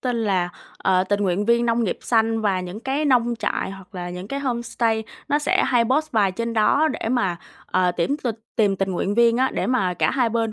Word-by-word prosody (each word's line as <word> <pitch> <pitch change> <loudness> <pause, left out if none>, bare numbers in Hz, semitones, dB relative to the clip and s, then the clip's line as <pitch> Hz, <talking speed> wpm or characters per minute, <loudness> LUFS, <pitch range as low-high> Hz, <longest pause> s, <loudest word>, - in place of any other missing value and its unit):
tên 250 -2 -1
là, 185 -3 +1 0.3
ờ, 185 -1 +2
"Tình 205 +1 0
nguyện 190 +1 0
viên 235 +1 +3
nông 230 0 +1
nghiệp - - -2
xanh", 225 -1 +1
và 195 -3 +1
những 180 +4 -7
cái 275 +4 -1
nông 240 -3 +3
trại - - -2
hoặc 195 +1 -12
là 175 -1 -5
những 180 +3 -7
cái 275 0 -3
homestay 235 -3 -1 0.2
nó 290 - +2
sẽ 295 - +1
hay 240 -2 +3
post 300 +4 0
bài 200 -4 +2
trên 230 +4 -3
đó 255 +8 +3
để 225 - -3
mà, 195 -9 0 0.3
ờ, 180 -1 +1
tuyển 225 +12 0
tình 235 -4 -1 0.2
tìm 205 -3 +2
tình 195 0 -1
nguyện 195 +3 -1
viên 235 0 +4
á, 260 +1 +2
để - - -1
mà 195 -8 +1
cả - - +1
hai 250 -3 +1
bên 225 -1 -1
225 Hz, 235 wpm, -22 LUFS, 190-245 Hz, 0.3 s, viên